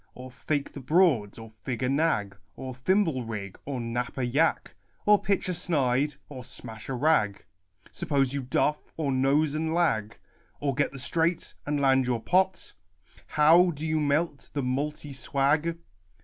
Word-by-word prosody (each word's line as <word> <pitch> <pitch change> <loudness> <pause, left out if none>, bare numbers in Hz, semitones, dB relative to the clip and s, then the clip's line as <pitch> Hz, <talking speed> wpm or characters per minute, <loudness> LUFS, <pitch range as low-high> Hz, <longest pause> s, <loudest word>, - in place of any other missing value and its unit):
Or 130 0 -9
fake 140 +4 -3
the - - -7
broads? 135 - +2
or 115 -1 -10
fig 125 -1 -3
a - - +2
nag? 135 -9 +1 0.2
Or 130 -1 -6
thimble 160 0 +1
rig? 105 -4 -6
or 135 -2 -3
knap 120 +2 -3
a 130 - 0
yack? 145 +7 +1 0.3
Or 210 0 +5
pitch 200 -1 0
a 180 - -1
snide? 145 -5 0
or 130 -4 -9
smash 110 -1 -10
a 135 - -2
rag? 120 -8 +1 0.5
Suppose 135 -3 0
you 140 - -2
duff? 145 +4 +1 0.2
or 150 -4 0
nose 140 +3 +2
and 160 +1 -1
lag? 110 -12 +1 0.4
Or 140 -1 0
get 145 +2 0
the 135 - -9
straight, 165 +5 -1
and 145 0 0
land 135 -2 +3
your 120 -2 0
pot? 185 +8 +1 0.5
How 165 +4 +5
do 155 -1 -5
you 155 0 +1
melt 150 0 0
the 140 - -1
multy 145 +3 -3
swag 145 +5 0
140 Hz, 165 wpm, -27 LUFS, 125-160 Hz, 0.5 s, Or